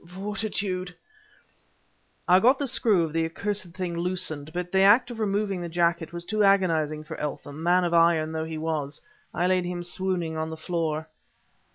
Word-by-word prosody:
fortitude..." 190 -1 -3 1.3
I 180 +1 +6
got 255 +6 +5
the 285 - -1
screw 220 -8 +2
of 160 -2 -4
the 165 0 +1
accursed 185 +2 -3
thing 180 -2 -3
loosened, 170 -4 -2
but 180 +1 -4
the 190 - +3
act 220 +6 +5
of 230 - -7
removing 200 -3 -1
the 170 - -4
jacket 170 -1 0
was 170 0 -6
too 215 +2 +1
agonizing 165 -6 +2
for 155 - -8
Eltham 145 0 -5
man 180 +2 +3
of 170 -1 0
iron 165 -2 +4
though 160 0 -3
he 160 0 -5
was. 155 -2 -3 0.3
I 175 - -1
laid 185 -1 +2
him 175 0 -4
swooning 175 -2 -2
on 160 0 -2
the 160 - -6
floor. 160 -1 -2
175 Hz, 180 wpm, -26 LUFS, 160-190 Hz, 1.3 s, I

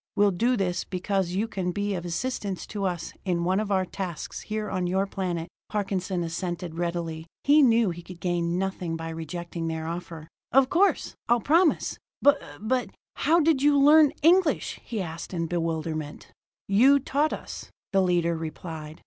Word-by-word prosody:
We'll 205 -1 +4
do 240 +7 +1
this 180 -3 -1
because 185 -1 -1
you 210 +4 0
can 185 -4 -2
be 205 +2 -1
of 175 -2 -4
assistance 195 +1 -3
to 200 -2 -4
us 175 -3 -3
in 175 -3 0
one 185 +3 +2
of 215 -1 -2
our 190 -1 +2
tasks 180 -3 -5
here 215 0 -3
on 185 -2 -1
your 190 +2 +1
planet." 180 -4 -3 0.2
Parkinson 190 -3 -1
assented 170 0 -4
readily; 170 -2 -3 0.2
he 295 +2 +6
knew 230 -6 +4
he 175 +1 -7
could 175 0 -11
gain 175 -1 0
nothing 185 -3 -2
by 165 0 -5
rejecting 165 +1 -5
their 160 -1 -3
offer. 165 -1 -6 0.2
"Of 270 0 +4
course 390 +3 +2 0.2
I'll 240 0 +5
promise. 320 - +2 0.2
But 285 0 +4 0.2
but, 250 +4 0 0.3
how 335 +2 +3
did 305 -3 +3
you 290 0 +5
learn 295 +1 +7
English?" 340 -2 +3
he 220 -5 -3
asked 165 +2 -7
in 165 -1 -1
bewilderment. 160 -3 -3 0.4
"You 250 +8 +6
taught 285 +3 0
us," - - -7 0.2
the 195 - +4
leader 175 -2 +2
replied. 160 -1 -7
185 Hz, 170 wpm, -26 LUFS, 170-225 Hz, 0.4 s, learn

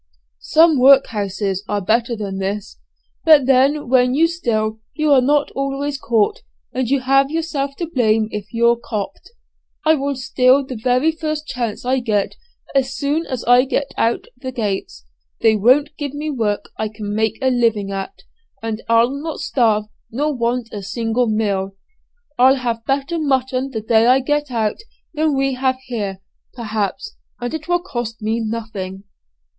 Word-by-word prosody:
Some 315 - +4
workhouses 205 -7 +3
are 205 - 0
better 230 +4 +1
than 200 -3 -5
this; 195 +1 -4 0.4
but 305 -5 +6
then 270 +2 +3
when 250 0 +3
you 320 +3 +5
steal 220 -10 -1 0.2
you 305 -1 +1
are 265 - +6
not 290 +3 +2
always 275 +1 -3
caught, 230 - +1 0.3
and 255 -2 -1
you 275 -1 +2
have 275 +1 +3
yourself 295 -3 -2
to 340 - -3
blame 225 -8 +1
if 210 0 -6
you're 235 0 +3
'copt.' 215 - -5 0.6
I 315 - +6
will 280 -2 -1
steal 260 +1 +3
the 260 - -6
very 250 +7 +2
first 310 -1 -4
chance 240 -5 -4
I 260 +1 +2
get, 215 -5 -1 0.4
as 270 0 0
soon 300 +3 -1
as 255 -3 -4
I 245 +2 +5
get 275 +1 -2
out 230 +1 0
at - - -22
the 260 +1 -6
gates. 205 - -4 0.4
They 220 -1 +5
won't 270 +8 +3
give 290 -1 -4
me 300 +1 -3
work 220 -6 -2
I 220 - 0
can 210 -1 -6
make 220 0 0
a 260 -1 +2
living 225 -5 +1
at, 195 0 -6 0.4
and 225 0 -3
I'll 230 +2 +4
not 295 +3 -5
starve 220 -5 +1 0.2
nor 295 +6 -1
want 240 -1 -1
a 205 - -5
single 230 +4 -1
meal. 200 -3 -1 0.6
I'll 260 +2 +6
have 235 -3 -3
better 280 +5 -1
mutton 265 -2 0
the 225 -5 -4
day 220 +1 +3
I 255 +1 +6
get 295 +2 -1
out 220 -4 -1 0.4
than 305 -2 +1
we 270 0 +1
have 260 0 0
here, 205 -6 -4 0.3
perhaps, 220 - -3 0.3
and 245 +3 -4
it 315 0 -5
will 350 0 +1
cost 240 -9 -5
me 220 +2 0
nothing." 215 -4 -5
250 Hz, 170 wpm, -19 LUFS, 220-275 Hz, 0.6 s, but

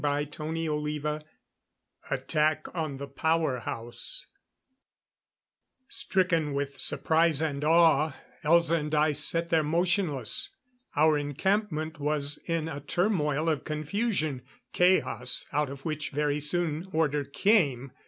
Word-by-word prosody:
CHAPTER 145 +1 -2
XXXV 150 -1 -2 0.9
Attack 155 0 +1
on 155 -5 -3
the 140 +1 -6
Power 155 -1 0
House 120 - -5 1.6
Stricken 165 -6 0
with 140 0 -3
surprise 160 -2 +3
and 150 -3 -2
awe, 160 -2 +4 0.3
Elza 170 +1 +4
and 150 0 -2
I 150 +1 +3
sat 165 +4 0
there 165 -1 +4
motionless. 170 - 0 0.5
Our 155 0 +4
encampment 160 +1 -1
was 145 0 -1
in 165 -2 -1
a 145 -3 -5
turmoil 155 -2 0
of 155 -5 0
confusion 155 - -1 0.3
chaos, 180 -9 +2
out 150 -1 +1
of 140 0 -9
which 155 -2 -2
very 145 0 0
soon 160 +2 0
order 150 -3 +1
came. 140 - +2
155 Hz, 115 wpm, -28 LUFS, 145-165 Hz, 1.6 s, awe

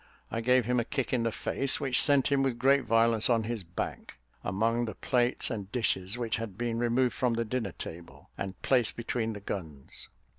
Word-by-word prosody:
I 115 - -1
gave 125 0 +4
him 125 +1 +2
a - - +1
kick 130 +1 -2
on 125 - +2
the 115 0 0
face, 135 +5 0
that 135 -3 -3
sent 140 -2 +4
him 140 -1 +3
with 135 -3 0
great 135 +1 +4
violence 115 0 +4
on 115 -2 +3
his 115 -2 -3
back, 85 +1 -5 0.3
among 115 +5 +1
the 110 -4 -5
plates 125 0 0
and 100 -3 -5
dishes, 105 -4 0
which 120 -2 -1
had 110 -4 -6
been 115 0 -1
removed 120 +1 +2
from 125 -2 +1
the 115 0 0
dinner 110 -5 -2
table 85 +1 -10
and 95 0 -5
placed 125 -4 +2
between 115 -1 -2
the 105 - -8
guns. 80 -9 -6
115 Hz, 200 wpm, -30 LUFS, 105-125 Hz, 0.3 s, gave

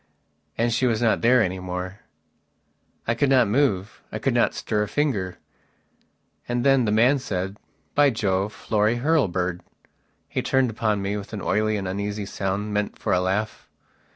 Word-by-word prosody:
And 115 0 +1
she 130 - +2
was 115 -3 +1
not 115 -2 +2
there 125 0 +5
any 95 -1 -2
more. 90 +1 -5 1.1
I 115 - +3
could 140 +4 +1
not 130 -4 +5
move; 105 -4 0
I - - -3
could - - 0
not - - +2
stir 105 - -1
a 105 - 0
finger. 105 -10 -1 1.1
And 120 0 0
then 135 -3 +4
that 105 - +1
man 125 +6 +4
said: 95 -4 -3 0.4
"By 145 -1 +5
Jove: 100 -3 0
Florry 105 +2 0
Hurlbird." 95 - +1 0.7
He - - -2
turned 130 -3 +2
upon 105 -2 -1
me 100 +1 -1
with 100 +2 -8
an 105 - -4
oily 110 0 +1
and 95 -2 -4
uneasy 100 +2 -3
sound 100 +2 -3
meant 105 0 -1
for - - -1
a 90 - +3
laugh. 100 +4 -2
105 Hz, 170 wpm, -24 LUFS, 95-120 Hz, 1.1 s, there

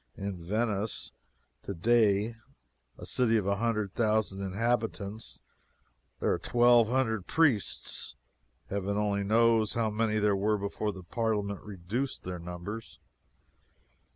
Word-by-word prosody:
In 100 -1 -3
Venice, 105 +4 -2 0.5
today, 105 +2 +2 0.6
a - - -9
city 115 -3 +2
of 105 - -1
a 100 0 +1
hundred 110 -3 -1
thousand 110 -4 +1
inhabitants, 105 - -2 0.8
there - - +1
are 85 - -1
twelve 120 +2 +5
hundred 110 -5 0
priests. 140 - +1 0.6
Heaven 100 +1 -1
only 100 -1 +1
knows 110 +1 +3
how 115 -2 +1
many 110 0 0
there 105 -1 +3
were 105 +2 +1
before 100 +1 -2
the 95 -2 -10
Parliament 105 0 -1
reduced 105 +7 -4
their 90 -1 -5
numbers. 90 +6 -7
105 Hz, 120 wpm, -30 LUFS, 100-115 Hz, 0.8 s, twelve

